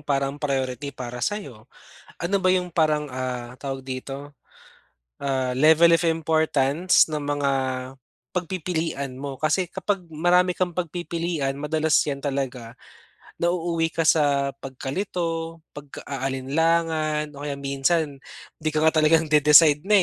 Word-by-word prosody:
parang 140 -1 -2
priority 135 -1 -2
para 125 -1 -6
sa'yo? 135 - -4 0.5
Ano 195 +4 +1
ba 185 -1 +1
'yung 180 -1 +1
parang, 155 -3 +1
ah, 125 -1 -4
tawag 135 -1 -5
dito, 135 +2 -6 0.9
ah, 130 -2 -1
level 160 +5 +6
of 165 - +2
importance 160 0 +2
ng 150 - -1
mga 145 -1 -1 0.8
pagpipilian 165 -6 -3
mo? 135 +1 -6
Kasi 155 +4 +1
kapag 200 -3 -2
marami 175 +3 +2
kang 180 -2 -1
pagpipilian 170 -4 -2
madalas 155 +2 0
'yan 140 -2 -3
talaga 130 -4 -3 0.7
nauuwi 170 -1 0
ka 165 - 0
sa 145 -3 +3
pagkalito, 165 +4 -4 0.2
pagka-aalinlangan 150 +3 -1
o 145 - -7
kaya 145 -1 -3
minsan 140 +2 0 0.4
di 155 -1 -1
ka 155 - +1
nga 160 0 +3
talagang 160 +1 +3
de-decide 150 0 +7
na, 210 - +1
150 Hz, 125 wpm, -24 LUFS, 140-165 Hz, 0.9 s, de-decide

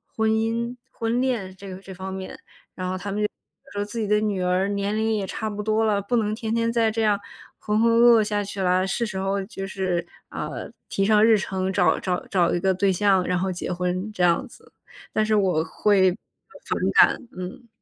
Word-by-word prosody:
婚 220 0 +2
姻 230 +2 0 0.2
婚 230 +1 -1
恋 225 -8 -1
这 200 - -10
个 185 - -7
这 195 - -11
方 190 +1 -6
面， 190 0 -7 0.4
然 185 -1 -4
后 185 - -2
他 200 +2 -5
们 205 - -2
就 210 - +2 0.5
说： 205 - -1
“自 210 +3 -6
己 215 - -1
的 210 +1 +3
女 205 -3 -1
儿 180 +2 +1
年 200 +1 -1
龄 220 0 +1
也 205 -2 -1
差 220 +3 -3
不 210 0 -4
多 220 +1 +1
了， 210 -2 +2
不 200 +5 -1
能 215 -1 0
天 225 -1 -3
天 230 0 +1
再 230 -1 +2
这 225 +1 -1
样 210 -2 +2 0.4
浑 210 +1 0
浑 230 - +4
噩 235 -1 +7
噩 - - +2
下 210 -1 -1
去 200 0 -5
了， 185 0 +2
是 235 +5 -1
时 190 -3 -5
候 195 +1 -1
就 195 0 -6
是 185 -3 -2 0.2
啊 - - -4 0.4
提 195 - -1
上 210 +1 +5
日 225 -1 +6
程， 190 -1 -2
找 180 -2 +3
找 180 -1 -2
找 180 -4 +2
一 175 - +1
个 190 +1 +2
对 195 +1 +2
象， 190 -1 +3
然 180 0 0
后 190 +1 -1
结 180 0 -4
婚“， 180 +3 -2
这 180 - -1
样 170 -1 +3
子， - - -18 0.4
但 215 - +1
是 215 0 +2
我 185 -6 +2
会 190 +3 +3
反 220 - -8 0.3
感。 - - -6
嗯。 195 +8 -7
200 Hz, 245 characters per minute, -24 LUFS, 185-220 Hz, 0.5 s, 噩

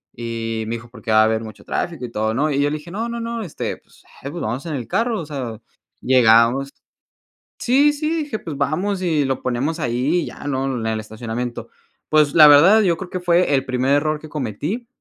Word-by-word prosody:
Y 115 -1 -4
me 115 - -2
dijo: 115 0 -10
"Porque 115 -1 -6
va 110 0 +6
a - - +6
haber 110 0 0
mucho 110 -1 -11
tráfico 165 -8 -3
y 115 - -9
todo", 110 +1 -1
¿no? 150 +6 +1
Y 140 - 0
yo 145 - +2
le 155 - -2
dije: 150 +3 -12
"No, 225 +4 -3
no, 235 0 -4
no, 230 0 -4
este 170 - -5
pues, - - -25 0.2
eh, 140 - -4
pues 170 - -6
vamos 120 +8 -3
en 160 - -3
el 120 -5 -5
carro, 230 - 0
o - - -7
sea". 130 -7 -6 0.4
Llegamos 125 +2 +4 0.9
Sí, 280 +4 +3
sí, 305 +1 -2
dije: 235 -7 -5
"Pues 150 -5 -7
vamos 180 +8 -1
y 160 -5 +1
lo 135 -1 -2
ponemos 135 +7 -2
ahí 125 +6 0
y - - -4
ya", - - -10
¿no?, 135 -1 -1
en 115 -2 -3
el 110 -1 -1
estacionamiento". 115 +2 -5 0.4
Pues 150 -2 +3
la 155 -2 +9
verdad, 170 +10 +7
yo 175 -5 +2
creo 185 -1 -7
que 185 - -4
fue 175 -2 +2
el 135 -1 +1
primer 130 +1 0
error 155 +1 0
que 155 - -11
cometí 150 - -4
140 Hz, 230 wpm, -20 LUFS, 120-175 Hz, 0.9 s, la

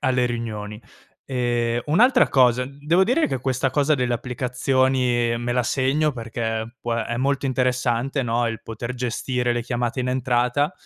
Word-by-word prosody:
alle 130 -3 +1
riunioni. 110 -3 -5 0.5
Ehm, 120 -2 0
un'altra 245 - +4
cosa, 125 -1 +3
devo 150 +7 +1
dire 265 +9 +2
che 135 - -2
questa 130 0 0
cosa 145 +3 +2
delle 125 -3 0
applicazioni 125 -1 0
me 120 +1 -2
la 125 0 +1
segno 140 +5 +1
perché 115 0 -4
può 120 -1 -2
è 115 0 -2
molto 135 +2 0
interessante, 125 +1 0
no, 120 0 0
il 115 - -5
poter 115 +2 -6
gestire 125 0 -1
le 120 0 -2
chiamate 120 +1 -2
in 125 - -2
entrata 125 +4 +1
125 Hz, 155 wpm, -23 LUFS, 120-135 Hz, 0.5 s, un'altra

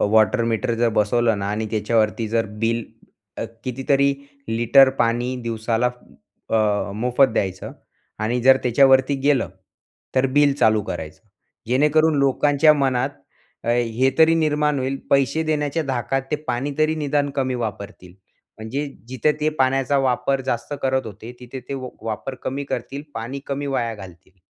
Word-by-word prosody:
अ, - - +3
water 110 +2 +4
meter 115 +1 -1
जर 120 - +4
बसवलं 115 +1 +2
ना 100 - -3
आणि 110 +1 -2
त्याच्यावरती 110 0 0
जर 115 +1 0 0.2
बिल 115 0 0 0.5
अ, - - -2 0.2
कितीतरी 135 +2 +1 0.3
लिटर 120 +4 +5
पाणी 120 +2 0
दिवसाला 115 +1 -1 0.6
अ, 105 -2 +1
मोफत 125 +5 +3
द्यायचं 95 -4 -2 0.5
आणि 120 +3 0
जर 130 +1 +7
त्याच्यावरती 135 +2 +4
गेलं, 140 -4 +2 0.7
तर 130 0 +3
बिल 145 -1 +5
चालू 110 -1 +4
करायचं. 80 -2 -7 0.5
जेणेकरून 150 +5 +3
लोकांच्या 145 +2 +4
मनात 135 -1 0 0.5
अ, - - -4
हे 120 +2 +1
तरी 160 0 +6
निर्माण 150 -2 +1
होईल, 130 +1 -2
पैसे 140 +3 +2
देण्याच्या 155 0 -1
धाकात 135 +1 -1
ते 150 - +1
पाणी 130 +4 -1
तरी 155 0 +2
निदान 145 -1 0
कमी 130 -1 0
वापरतील. 100 -4 -8 0.4
म्हणजे 130 +7 -4 0.2
जिथं 130 +4 +1
ते 155 - +2
पाण्याचा 135 +1 +2
वापर 130 +1 +1
जास्त 120 +5 -2
करत 130 -1 0
होते, 110 +3 -9
तिथे 125 +1 -8
ते 140 - -3
व 130 -1 -5
वापर 110 +4 -4
कमी 140 +2 -3
करतील, 140 0 -5
पाणी 120 +5 -5
कमी 140 +1 -3
वाया 120 -4 -1
घालतील. 95 -2 -14
130 Hz, 150 wpm, -22 LUFS, 115-140 Hz, 0.7 s, जर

